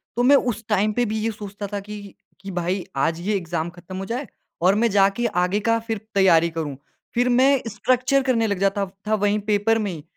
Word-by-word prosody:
तो 245 - +1
मैं 275 +3 +6
उस 240 -5 0
टाइम 210 0 +2
पे 245 +2 +1
भी 220 0 -2
ये 225 +1 -1
सोचता 205 -1 -7
था 205 - -1
कि, 205 -1 -9 0.2
कि 195 0 -8
भाई 180 +1 -2
आज 160 +4 +1
ये 205 +4 0
एग्ज़ाम 170 -2 -3
खत्म 175 +2 -10
हो 195 - -4
जाए 245 +6 -4 0.3
और 185 +3 +4
मैं 230 +2 +2
जाके 200 +4 +3
आगे 180 0 0
का 230 +2 +2
फिर 225 -1 -1 0.2
तैयारी 170 -4 +5
करूँ। 160 -4 -4 0.4
फिर 245 +1 +2
मैं 260 +2 +4
स्ट्रक्चर 255 +5 +1
करने 235 -4 +1
लग 200 -3 -2
जाता 195 +1 +1 0.2
था 215 - +3
वहीं 205 0 +1
पेपर 210 +2 +1
में 205 -3 -2
ही, 160 -4 -7
205 Hz, 220 wpm, -23 LUFS, 190-230 Hz, 0.4 s, मैं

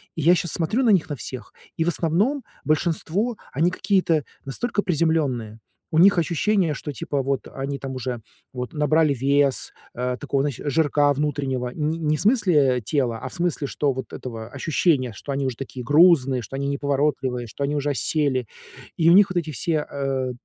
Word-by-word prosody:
И 160 - -3
я 170 +4 +6
щас 170 -1 0
смотрю 175 +10 0
на 235 - +3
них 180 -5 +2
на 145 - -2
всех, 130 +3 -7 0.2
и 165 - +1
в - - -3
основном, 195 - 0 0.2
большинство, 170 +8 0 0.2
они 160 +6 +2
какие-то 185 -6 +1 0.2
настолько 205 - -2
приземленные, 150 - 0 0.3
у 160 - 0
них 195 +1 +6
ощущение, 170 +2 +1
что 145 - -6
типа 140 +2 -2
вот 135 0 -2
они 140 +1 -4
там 135 -1 -6
уже 125 -2 -4 0.3
вот 125 -1 -5
набрали 150 0 +2
вес, 140 +1 +1 0.2
э, 125 +1 -2
такого 140 -1 -1
знаешь 145 -4 -3
жирка 145 -1 +3
внутреннего, 135 -3 -2
не 155 +1 -1
не 155 -1 +1
в - - -3
смысле 165 - +3
тела, 120 -1 -1
а 130 - -6
в - - -13
смысле, 170 -5 -1
что 145 +1 0
вот 130 0 -7
этого 115 -3 -7
ощущения, 140 -2 +1
что 140 - -7
они 135 0 -1
уже 130 -3 -3
такие 130 -2 -7
грузные, 145 -4 +5
что 120 - -8
они 140 +1 -2
неповоротливые, 140 -3 -1
что 125 +6 -5
они 145 +1 -2
уже 145 0 -1
осели, 140 -3 0 0.5
и 165 0 +4
у - - +7
них 200 +1 +6
вот 185 - -3
эти 160 -2 -1
все, 150 +4 -1
э, 135 -2 -2
145 Hz, 190 wpm, -23 LUFS, 130-165 Hz, 0.5 s, у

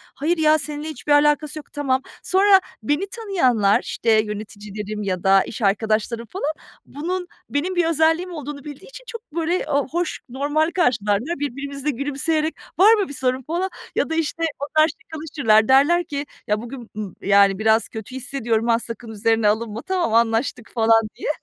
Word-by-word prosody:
"Hayır 325 +5 0
ya, 310 0 +4
seninle 295 +1 -5
hiçbir 300 -1 -5
alakası 295 +1 +3
yok." - - -15
Tamam. 265 -3 0 0.2
Sonra 385 +1 +5 0.2
beni 295 - 0
tanıyanlar, 260 - +2
işte 230 - -1
yöneticilerim 210 -1 -2
ya 185 -3 -2
da 195 0 +5
iş 225 - -8
arkadaşlarım 220 +3 0
falan, 310 -5 -2 0.3
bunun 360 +5 -4 0.2
benim 340 +6 -1
bir 350 -1 +2
özelliğim 325 +3 +2
olduğunu 295 -3 -7
bildiği 290 -2 -10
için - - -11
çok 460 -1 -7
böyle, 340 +2 0
ııı, 285 -2 +1
hoş 345 0 -2
normal 290 +5 0
karşılarlar. 250 - 0
Birbirimize 280 +1 -4
gülümseyerek 290 +4 -1 0.2
"Var 415 +4 +8
mı 415 -3 +1
bir - - -6
sorun?" 265 - -8 0.2
falan 350 +4 -1 0.3
ya - - 0
da, 320 - -1
işte, 330 +1 -1 0.2
onlar 310 +2 +3
şakalaşırlar. 300 - +1
Derler 290 +7 +5
ki, 285 -2 -4 0.2
"Ya 210 0 0
bugün 240 0 -9
m 210 -3 -5
yani 200 0 +4
biraz 220 +1 +3
kötü 225 +3 -8
hissediyorum, 235 -3 -1
ha, 230 -1 +3
sakın 230 0 -8
üzerine 225 +1 +1
alınma." 220 +1 -1
"Tamam, 365 -11 -1
anlaştık." 230 +1 +1
falan 225 -1 +4
diye. - - -4
280 Hz, 165 wpm, -22 LUFS, 225-320 Hz, 0.3 s, Var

